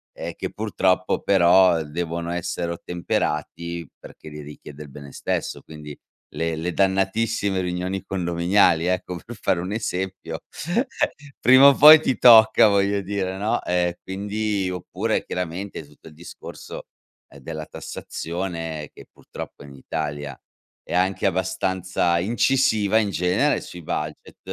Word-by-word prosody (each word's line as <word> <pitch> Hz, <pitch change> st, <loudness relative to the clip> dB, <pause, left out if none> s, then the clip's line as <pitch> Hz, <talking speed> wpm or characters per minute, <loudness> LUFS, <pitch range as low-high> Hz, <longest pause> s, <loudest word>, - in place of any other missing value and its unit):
ehm, -, -, -6 dB
che, -, -, -5 dB
purtroppo, 95 Hz, -3 st, 0 dB
però, 90 Hz, -2 st, +5 dB
devono 85 Hz, +2 st, -4 dB
essere 85 Hz, 0 st, -3 dB
ottemperati, 85 Hz, -1 st, -3 dB
perché -, -, -13 dB
li 75 Hz, 0 st, -9 dB
richiede 75 Hz, 0 st, -11 dB
il 75 Hz, -, -13 dB
bene 70 Hz, 0 st, -11 dB
stesso. -, -, -3 dB
Quindi, 75 Hz, -2 st, -10 dB, 0.4 s
le 80 Hz, 0 st, -1 dB
le 85 Hz, +3 st, -3 dB
dannatissime 95 Hz, +1 st, 0 dB
riunioni 90 Hz, +2 st, -3 dB
condominiali, 85 Hz, -1 st, +2 dB
ecco, 90 Hz, -1 st, -2 dB
per 120 Hz, -, -9 dB
fare 90 Hz, -, +1 dB
un 90 Hz, +3 st, -4 dB
esempio. 95 Hz, -6 st, -4 dB, 1.0 s
Prima 130 Hz, +4 st, +8 dB
o 140 Hz, -, +6 dB
poi 155 Hz, +3 st, +10 dB
ti 130 Hz, -, 0 dB
tocca, 110 Hz, -2 st, +7 dB
voglio 100 Hz, 0 st, +1 dB
dire, 95 Hz, -1 st, -3 dB
no? 105 Hz, +3 st, -1 dB
Ehm, 90 Hz, -1 st, 0 dB
quindi 100 Hz, +1 st, -2 dB
oppure, 90 Hz, -1 st, -2 dB
chiaramente, 90 Hz, -1 st, -5 dB
tutto 75 Hz, +2 st, -18 dB
il -, -, -17 dB
discorso, 85 Hz, +2 st, -10 dB, 0.4 s
ehm, 70 Hz, -, -15 dB
della 80 Hz, +2 st, -6 dB
tassazione 80 Hz, -4 st, -6 dB
che, -, -, -14 dB
purtroppo, -, -, -10 dB
in 70 Hz, -1 st, -12 dB
Italia 75 Hz, 0 st, -5 dB, 0.5 s
è -, -, -7 dB
anche 95 Hz, +2 st, +1 dB
abbastanza 95 Hz, -1 st, 0 dB
incisiva, 110 Hz, 0 st, +2 dB
in 110 Hz, -2 st, +2 dB
genere, 95 Hz, -, +1 dB
sui 90 Hz, -1 st, -10 dB
budget, 75 Hz, 0 st, -5 dB
90 Hz, 130 wpm, -23 LUFS, 80-100 Hz, 1.0 s, poi